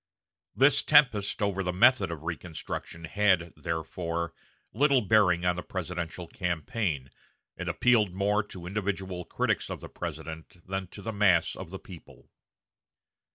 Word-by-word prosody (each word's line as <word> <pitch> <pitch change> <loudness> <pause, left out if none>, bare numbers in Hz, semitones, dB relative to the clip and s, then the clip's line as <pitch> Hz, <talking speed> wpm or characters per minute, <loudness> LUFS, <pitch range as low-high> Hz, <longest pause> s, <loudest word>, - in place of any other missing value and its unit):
This 135 +2 +5
tempest 125 -10 +4
over 100 -1 0
the 90 -1 -1
method 95 +1 +5
of 80 -3 -6
reconstruction 85 0 -6
had, 90 -1 +2
therefore, 85 0 -3 0.4
little 140 +2 +4
bearing 95 -5 +3
on 90 0 +3
the 90 - -4
presidential 90 -1 -5
campaign, 85 - -2 0.4
and - - -4
appealed 110 -6 +3
more 100 +3 +1
to 90 -4 -10
individual 95 -2 -3
critics - - -1
of - - -5
the - - -9
President 80 +2 -7
than 95 0 -3
to 100 +3 -11
the 115 - -3
mass 100 -5 +3
of 95 - -8
the 95 - -6
people. 90 -3 -14
95 Hz, 140 wpm, -28 LUFS, 85-105 Hz, 0.4 s, This